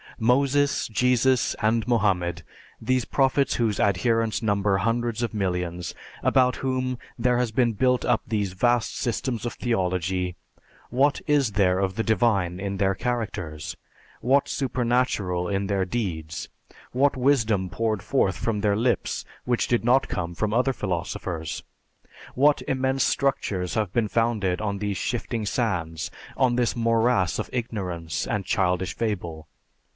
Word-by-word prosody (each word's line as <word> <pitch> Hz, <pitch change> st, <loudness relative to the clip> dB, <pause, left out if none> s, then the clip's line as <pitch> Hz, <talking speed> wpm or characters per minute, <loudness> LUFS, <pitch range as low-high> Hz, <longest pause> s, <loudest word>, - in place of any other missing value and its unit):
Moses, 140 Hz, +4 st, +2 dB
Jesus, 125 Hz, +2 st, +2 dB
and 110 Hz, 0 st, +1 dB
Mohammed 90 Hz, -7 st, +1 dB, 0.4 s
these 130 Hz, +1 st, 0 dB
prophets 135 Hz, +2 st, +2 dB
whose 110 Hz, -4 st, 0 dB
adherents 115 Hz, +3 st, +1 dB
number 100 Hz, -2 st, +2 dB
hundreds 115 Hz, +2 st, 0 dB
of 115 Hz, -, -2 dB
millions, 90 Hz, -4 st, -2 dB, 0.3 s
about 125 Hz, -1 st, +3 dB
whom 130 Hz, -1 st, -1 dB, 0.2 s
there 125 Hz, 0 st, +2 dB
has 125 Hz, -3 st, 0 dB
been 120 Hz, 0 st, +2 dB
built 125 Hz, +3 st, +2 dB
up 120 Hz, -3 st, +2 dB
those 105 Hz, -4 st, -1 dB
vast 120 Hz, +4 st, +1 dB
systems 120 Hz, -1 st, -2 dB
of -, -, -4 dB
theology, 90 Hz, -5 st, -1 dB, 0.6 s
what 140 Hz, +4 st, +2 dB
is 140 Hz, -7 st, +2 dB
there 95 Hz, -2 st, +3 dB
of 95 Hz, -1 st, -1 dB
the 110 Hz, -, 0 dB
divine 100 Hz, -5 st, +1 dB
in 100 Hz, 0 st, -3 dB
their 95 Hz, 0 st, +2 dB
characters? 95 Hz, -10 st, -3 dB, 0.5 s
What 135 Hz, +3 st, +3 dB
supernatural 120 Hz, -9 st, 0 dB
in 100 Hz, 0 st, -1 dB
their 95 Hz, -2 st, 0 dB
deeds? 85 Hz, -8 st, -4 dB, 0.4 s
What 135 Hz, +2 st, +2 dB
wisdom 115 Hz, -8 st, +2 dB
poured 110 Hz, +3 st, -1 dB
forth 100 Hz, -9 st, +1 dB
from 110 Hz, -3 st, -1 dB
their 100 Hz, -1 st, +2 dB
lips 120 Hz, +3 st, 0 dB, 0.2 s
which 120 Hz, -1 st, +1 dB
did 120 Hz, -2 st, +1 dB
not 125 Hz, +3 st, +3 dB
come 85 Hz, -2 st, -3 dB
from 105 Hz, +4 st, -1 dB
other 125 Hz, +3 st, +2 dB
philosophers? 85 Hz, -5 st, -3 dB, 0.7 s
What 145 Hz, +3 st, +4 dB
immense 130 Hz, 0 st, +1 dB
structures 105 Hz, -10 st, 0 dB
have 105 Hz, -5 st, -1 dB
been 115 Hz, -3 st, +2 dB
founded 110 Hz, -5 st, 0 dB
on 100 Hz, -2 st, -2 dB
these 100 Hz, -1 st, -2 dB
shifting 115 Hz, -1 st, -2 dB
sands, 85 Hz, -8 st, -1 dB, 0.3 s
on 125 Hz, -3 st, +3 dB
this 120 Hz, -1 st, +1 dB
morass 115 Hz, -5 st, +2 dB
of -, -, -3 dB
ignorance 90 Hz, -, -3 dB
and 105 Hz, -3 st, -2 dB
childish 90 Hz, -2 st, 0 dB
fable? 85 Hz, -8 st, -3 dB
110 Hz, 140 wpm, -25 LUFS, 95-125 Hz, 0.7 s, What